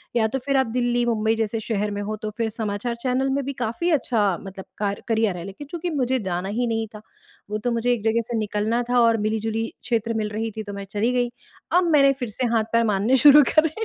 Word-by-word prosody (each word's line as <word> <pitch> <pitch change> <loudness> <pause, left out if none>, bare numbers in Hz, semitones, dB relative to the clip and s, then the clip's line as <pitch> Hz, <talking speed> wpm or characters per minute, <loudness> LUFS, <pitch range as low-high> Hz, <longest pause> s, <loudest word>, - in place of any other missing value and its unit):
या 225 -2 +3
तो 265 +5 -3
फिर 275 -1 +2
आप 265 -2 +2
दिल्ली, 240 +1 0
मुंबई 220 -1 +1
जैसे 225 0 -1
शहर 210 -1 -2
में 205 0 -3
हो 210 +1 -3
तो 215 - -2
फिर 225 -1 0
समाचार 220 +1 -3
चैनल 260 +1 +1
में 275 +1 0
भी 280 - -3
काफ़ी 240 +10 -1
अच्छा 215 - +1
मतलब 195 -1 -9
कार 200 -1 -2
करियर 220 -5 +1
है। 170 - -6
लेकिन 195 +9 -9
चूँकि 345 0 -3
मुझे 255 +1 +1
जाना 180 +2 -2
ही 245 0 +1
नहीं 225 -1 -1
था, 210 - -9 0.5
वो 210 - -1
तो 240 +3 -2
मुझे 235 +1 +1
एक 225 -4 -4
जगह 225 +1 +2
से 235 -2 -2
निकलना 215 +3 0
था 245 0 +3
और 230 -1 +4
मिली-जुली 220 +1 -1 0.2
क्षेत्र 230 -1 -1
मिल 215 -1 -1
रही 220 +1 -3
थी 220 - -3
तो 205 -1 -7
मैं 200 0 -6
चली 215 +4 +1
गई, 245 -1 0 0.4
अब 355 0 +3
मैंने 275 -2 +5
फिर 245 -3 -3
से 230 +4 -2
हाथ 220 - +3
पैर 230 0 +4
मारने 205 +7 +2
शुरू 290 +3 +8
करे। 310 0 +5
225 Hz, 245 wpm, -23 LUFS, 215-245 Hz, 0.5 s, शुरू